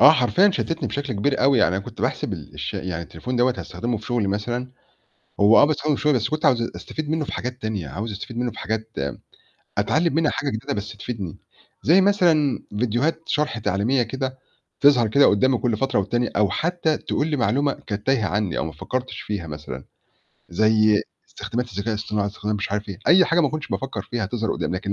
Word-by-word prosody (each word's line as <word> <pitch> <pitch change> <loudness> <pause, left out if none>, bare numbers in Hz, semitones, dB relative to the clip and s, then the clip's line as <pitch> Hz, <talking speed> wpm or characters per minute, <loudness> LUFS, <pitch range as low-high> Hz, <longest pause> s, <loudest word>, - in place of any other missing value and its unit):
آه، 145 - +10
حرفيًا 160 +8 +4
شتتني 165 -3 -2
بشكل 140 -2 -3
كبير 130 +7 0
أوي، 135 -1 +5
يعني 95 -4 +3
أنا 95 - -3
كنت - - -9
باحسب - - -1
ال - - -8
الش - - -4
يعني 85 -2 -3
التليفون 105 +10 -5
دوّة 125 +1 +3
هاستخدمه 120 0 -3
في - - -12
شغلي 120 -5 0
مثلًا، 120 +6 -2 0.7
هو 105 +2 +7
آه - - +8
باستخدمه 150 0 +1
في - - -7
شغلي 150 -1 +4
بس 115 +1 -1
كنت 155 +2 -3
عاوز 125 -3 +4
أستفيد 155 -1 -5
منه 160 -1 0
في - - -7
حاجات 125 +1 -4
تانية، 105 -9 -3
عاوز 105 - -4
أستفيد 105 +4 -7
منه 120 0 0
في - - -12
حاجات 110 +1 -3 0.9
أتعلّم 155 +10 +2
منها 160 -1 +3
حاجة 135 +2 -2
جديدة 110 -2 -3
بس 105 +1 -5
تفيدني، 105 -6 -5 0.4
زي 175 +6 +6
مثلًا 175 -8 +3 0.2
فيديوهات 125 +8 0
شَرْح 150 -6 0
تعليمية 110 +6 +1
كده 130 +3 -4 0.4
تظهَر 130 -6 +6
كده 140 +6 +5
قدّامي 125 +5 +3
كلّ 120 -3 0
فترة 135 +1 0
والتانية، 115 +4 0
أو 105 -1 +3
حتّى 170 -2 0
تقول 145 - -1
لي 155 -2 0
معلومة 140 +3 +2
كانت 105 +1 -6
تايهة 125 -7 +2
عني 100 -3 -1
أو - - 0
ما 80 - -5
فكّرتش 130 0 -4
فيها 100 -5 -4
مثلًا، 75 -4 -7 0.6
زي 110 +2 +3 0.3
استخدامات 120 0 -4
الذكاء 100 +4 -3
الاصطناعي، 105 -1 -1
استخدام 105 +1 -3
مش 100 0 -3
عارف 105 0 -2
إيه، 95 - -6
أي 180 +3 +7
حاجة 165 +1 +2
ما 150 - +3
كنتش 155 +2 -5
بافكّر 135 0 -3
فيها 120 -4 -1
تظهَر 110 +1 -1
قدّامي، - - -2
لكن 100 +2 -3
120 Hz, 205 wpm, -23 LUFS, 105-140 Hz, 0.9 s, آه